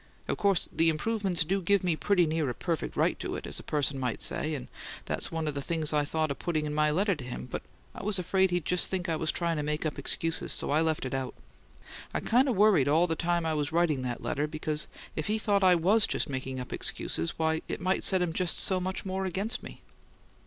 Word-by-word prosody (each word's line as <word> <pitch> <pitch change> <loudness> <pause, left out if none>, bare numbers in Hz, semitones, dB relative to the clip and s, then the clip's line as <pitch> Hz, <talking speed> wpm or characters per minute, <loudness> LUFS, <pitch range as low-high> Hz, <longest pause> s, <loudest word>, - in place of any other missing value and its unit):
Of - - 0
course, 200 -4 +2
the 165 0 +4
improvements 185 0 0
do 195 +4 0
give 200 +2 +2
me 175 -3 +2
pretty 180 +1 +2
near 155 -3 0
a 120 - -3
perfect 170 -3 -3
right - - +1
to - - -3
it, - - -6
as - - -2
a - - -10
person 145 -2 -1
might 125 -3 -2
say; 155 0 -1
and 130 - -6 0.4
that's - - -2
one 160 -1 -2
of 150 - -1
the 140 - -3
things 155 +1 -1
I 150 -1 +2
thought 155 0 -1
of 140 - -5
putting 155 -3 -1
in 150 - -3
my 150 0 +3
letter 195 +6 +2
to 150 -6 -6
him; 125 0 -6
but 125 - -5 0.3
I 230 - -8
was 205 0 0
afraid 190 +1 +2
he'd 175 -2 -1
just 180 0 +1
think 190 -1 -2
I 165 - 0
was 155 0 0
trying 170 -2 0
to - - 0
make 150 +2 -2
up 155 - -2
excuses, 165 0 0
so - - -1
I 150 +2 +3
left 160 -3 0
it 130 - -4
out. 130 -1 -3 0.8
I - - +2
kind 255 +4 +3
of 245 - +1
worried 195 -9 +5
all 160 +4 +4
the 165 -2 -1
time 170 0 0
I 160 - 0
was 150 0 -1
writing 160 -5 +2
that 125 -2 -4
letter, 150 +2 -1
because 155 0 -1 0.3
if 155 - -2
he 215 +1 +1
thought 205 -2 +1
I 185 -1 +6
WAS 200 +6 +4
just - - 0
making 130 -1 -4
up 125 - -6
excuses, 80 +1 0
why, 160 0 +1
it - - -3
might 185 +1 0
set 185 -2 +3
him 170 -2 -2
just 180 -1 +1
so 190 -1 +2
much 185 +2 -4
more 190 0 -2
against 195 +5 -2
me." - - -11
165 Hz, 250 wpm, -29 LUFS, 150-185 Hz, 0.8 s, I